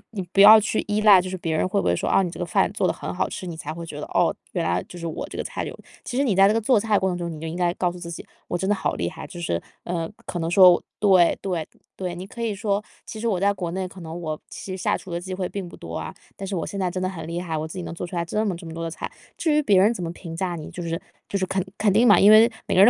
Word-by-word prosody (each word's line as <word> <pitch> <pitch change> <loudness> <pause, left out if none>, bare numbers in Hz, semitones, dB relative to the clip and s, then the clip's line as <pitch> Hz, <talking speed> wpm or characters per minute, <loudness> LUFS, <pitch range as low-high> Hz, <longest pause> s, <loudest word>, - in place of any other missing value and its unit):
你 195 - -2
不 195 - +4
要 215 +2 +11
去 215 +1 -1
依 210 0 0
赖 210 -3 +8
就 185 - -6
是 185 - -4
别 165 -2 -2
人 155 - +1
会 200 +2 0
不 - - -2
会 - - +3
说， - - -2
“哦 - - +4
你 180 - -2
这 - - -10
个 175 - -1
饭 170 - +2
做 - - +1
得 - - +1
很 - - -6
好 95 +1 0
吃”， - - -6
你 170 - -5
才 155 -1 -5
会 170 +1 -7
觉 150 -2 -7
得， - - -4
哦， - - +2 0.2
原 - - 0
来 85 +1 +1
就 180 - -9
是 170 - -6
我 160 - -5
这 - - -8
个 - - -2
菜 - - -4
有。 - - -6 0.3
其 245 - -4
实 275 - +3
你 230 -8 +1
在 195 +1 +7
这 205 - +3
个 - - +3
做 230 +1 +4
菜 215 -1 +2
过 190 - +1
程 175 - -3
中， 170 -1 -4
你 155 - -7
就 160 - -6
应 160 - -5
该 175 -1 +1
告 180 -1 0
诉 180 - -10
自 170 -1 -7
己， 165 - -7 0.2
“我 175 - -1
真 190 +2 -2
的 205 - +3
好 - - -1
厉 - - -2
害”。 - - -9
就 175 - -9
是， 85 - -1 0.2
呃， 170 -2 -3 0.2
可 - - -4
能 165 0 -1
说 180 -1 +7 0.2
对- 190 -4 +5
对- 175 -5 -2 0.3
对， 180 -2 -4
你 180 +2 -7
可 235 - -9
以 230 -2 0
说： 205 0 -1 0.2
“其 220 - -7
实 235 - -1
我 195 -5 +1
在 200 +2 +3
国 180 -3 -4
内 185 +1 -2
可 185 0 -12
能 165 +1 -6
我 155 -2 -3
其 185 - -6
实 185 - -7
下 - - +1
厨 185 - -11
的 170 - -2
机 185 +1 -6
会 185 -1 -2
并 195 -3 -5
不 - - -11
多 - - -8
啊， - - -5 0.2
但 195 - -6
是 195 - -3
我 170 - -2
现 200 - -5
在 185 -2 +1
真 185 +1 -4
的 185 - 0
很 165 -4 -7
厉 170 +1 -3
害， 170 -3 -3
我 155 +1 -3
自 160 - -9
己 180 - -4
能 170 - -6
做 170 - -5
出 180 - -8
来 170 -1 -1
这 210 +6 -1
么 195 -4 -1
这 170 +1 -10
么 160 - -7
多 165 0 -5
的 165 - -2
菜”。 - - -6 0.3
至 325 - +1
于 300 - +4
别 200 -7 +5
人 210 +5 +5
怎 185 - -5
么 165 - -3
评 165 -1 -8
价 175 0 -2
你 155 -2 -7
就 180 - -7
是 165 0 -3 0.3
就 200 - 0
是 190 - 0
肯 190 0 -1
肯 210 -2 +3
定 230 +4 +5
嘛， 205 - +7
因 205 - +7
为 225 +2 +8 0.2
每 - - 0
个 185 - +7
人 - - +8
185 Hz, 375 characters per minute, -24 LUFS, 170-200 Hz, 0.3 s, 要